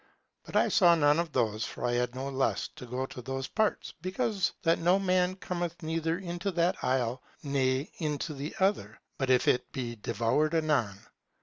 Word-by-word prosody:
But - - -10
I - - +5
saw 175 -4 +5
none 145 0 +4
of 170 -2 -1
those, 110 -5 0
for - - -4
I 120 - +1
had 125 0 0
no 130 +1 -3
lust 135 -1 -1
to 125 - -9
go 125 +2 -2
to 130 - -9
those 135 +1 -4
parts, 215 -2 0
because 195 +1 0
that 165 -1 +3
no 175 +3 +4
man 185 -1 +2
cometh 175 -2 -4
neither 165 +1 -1
into 175 0 -3
that 170 +1 +1
isle 125 -1 0 0.2
ne 135 0 +1
into 150 -1 -2
the 145 +2 -6
other, 190 - 0 0.2
but 135 -2 0
if 125 -1 +4
he 125 - +4
be 120 -5 -4
devoured 120 +10 0
anon. 130 -11 +1
150 Hz, 185 wpm, -30 LUFS, 130-175 Hz, 0.2 s, I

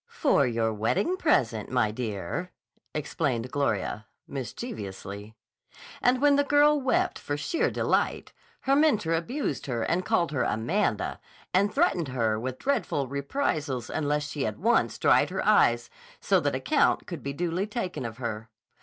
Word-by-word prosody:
"For 305 - +2
your 115 -2 0
wedding 180 - 0
present, 120 - +1
my 125 -4 +1
dear," 110 - -4 0.4
explained 135 -5 -2
Gloria 110 -5 -1 0.2
mischievously. 105 - -6 0.7
And 250 +1 +3
when 285 0 +4
the 285 - +4
girl 290 +1 +4
wept 260 - +1
for 145 - -3
sheer 325 - 0
delight, - - 0 0.3
her 275 0 +2
mentor 240 - +3
abused 170 - -2
her 120 -3 -1
and 180 +2 0
called 215 -7 +1
her 145 - -1
"Amanda," 120 - 0 0.3
and 200 +3 +3
threatened 235 - +1
her 115 -4 0
with 130 +2 -4
dreadful 145 - -1
reprisals 140 - -2
unless 150 -1 -1
she 145 -1 -3
at 105 -1 -2
once - - +2
dried - - +4
her - - -3
eyes 120 0 +4 0.3
so - - +3
that - - 0
account - - +2
could - - -6
be 140 - -4
duly 175 +5 -1
taken 210 - -4
of 115 -1 -6
her. 115 -3 -5
145 Hz, 150 wpm, -27 LUFS, -, 0.7 s, when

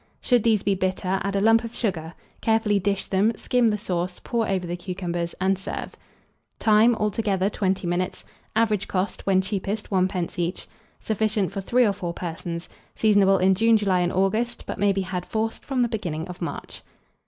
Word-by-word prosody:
Should 245 -2 +3
these 220 -2 +2
be 200 - +2
bitter, 190 0 -1
add 200 0 -2
a - - +2
lump 225 +2 +5
of 230 0 -7
sugar; 170 -7 -2 0.3
carefully 220 -2 +2
dish 200 +1 -1
them, 200 +4 +2
skim 245 +1 +2
the 210 - 0
sauce, 180 -2 -3
pour 235 -2 -1
over 190 -2 0
the 175 0 -3
cucumbers, 175 -1 -4
and 190 0 +1
serve. 190 - -5 0.6
Time. 220 +2 +5
Altogether, 205 -2 0
20 190 -2 -1
minutes. 175 +1 -2 0.3
Average 215 -3 +2
cost, 185 +1 -2
when 190 -1 +4
cheapest, 200 +2 -3
1d. 185 -1 0
each. 175 +2 -2 0.3
Sufficient 215 -3 0
for 195 0 -4
3 245 +6 +3
or 205 - +2
4 180 -4 -4
persons. 170 0 -5 0.3
Seasonable 200 -3 +4
in 190 +1 +4
June, 225 +3 +4
July, 195 -3 +1
and 175 0 +1
August; 215 +6 0
but - - -5
may 205 0 +4
be 195 0 0
had, 185 -1 -3
forced, 220 +3 -3
from 260 -3 0
the - - +2
beginning 175 -8 -3
of 180 0 -9
March. 170 - -5
195 Hz, 185 wpm, -24 LUFS, 185-220 Hz, 0.6 s, lump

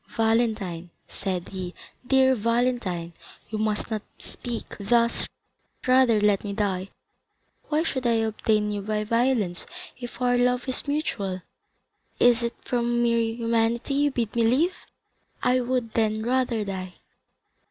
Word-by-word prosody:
"Valentine," 220 -7 +1 0.2
said 185 -3 -3
he, 185 -2 -6 0.3
"dear 265 0 +5
Valentine, 230 -7 0 0.4
you 215 - -2
must 215 +1 -1
not 215 -1 -1 0.2
speak 240 -2 -6
thus—rather 235 +2 +1
let 205 -1 +3
me 205 -1 -3
die. 195 -2 -1 0.8
Why 310 +1 +2
should 260 -6 -1
I 235 - +4
obtain 215 -1 +1
you 205 -1 -2
by 210 +1 -1
violence, 230 -5 +1 0.3
if 245 -1 -8
our 245 -1 +2
love 250 +1 +2
is 260 +2 -1
mutual? 200 - -2 0.8
Is 245 -1 +5
it 235 0 -2
from 240 -1 +1
mere 235 0 +3 0.2
humanity 230 +2 +1
you 290 +1 +3
bid 235 -5 -2
me 235 - +2
live? 270 +11 +3 0.7
I 250 +1 +4
would 245 -2 -1
then 220 -1 +1
rather 240 -3 +1
die." 185 -2 -5
230 Hz, 130 wpm, -26 LUFS, 210-245 Hz, 0.8 s, dear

